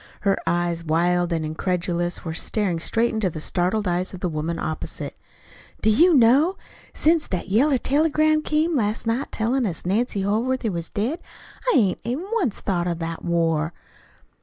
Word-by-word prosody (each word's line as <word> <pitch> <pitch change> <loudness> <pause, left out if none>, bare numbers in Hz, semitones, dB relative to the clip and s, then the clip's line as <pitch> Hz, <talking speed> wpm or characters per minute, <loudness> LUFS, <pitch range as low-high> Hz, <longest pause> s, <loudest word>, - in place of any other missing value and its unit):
Her 195 -1 +2
eyes, 175 -1 0
wild 175 +2 +1
and 160 -2 -1
incredulous, 175 +2 -2
were 160 - -3
staring 185 0 -1
straight 230 +7 +1
into 220 -4 0
the 155 - -7
startled 185 +6 0
eyes 180 +2 -1
of - - -9
the 180 - -1
woman 160 +2 -3
opposite. 155 0 -4 0.7
"Do 220 - +5
you 335 +10 +5
know? 275 +9 +4 0.3
Since 320 0 +2
that 185 0 -4
yeller 265 +8 +3
telegram 310 +3 +2
came 310 +2 0
last 215 -3 -1
night 230 +5 -1
tellin' 235 +2 0
us 175 -3 -4
Nancy 205 +1 0
Holworthy 225 +3 0
was 170 -2 -4
dead, 245 +12 -2 0.5
I - - +2
hain't 195 -6 +2
even 270 +9 -3
once 365 - 0
thought 180 -3 -1
of 170 -1 -1
the 165 0 -3
war." 165 -1 0
195 Hz, 165 wpm, -23 LUFS, 175-255 Hz, 0.7 s, Do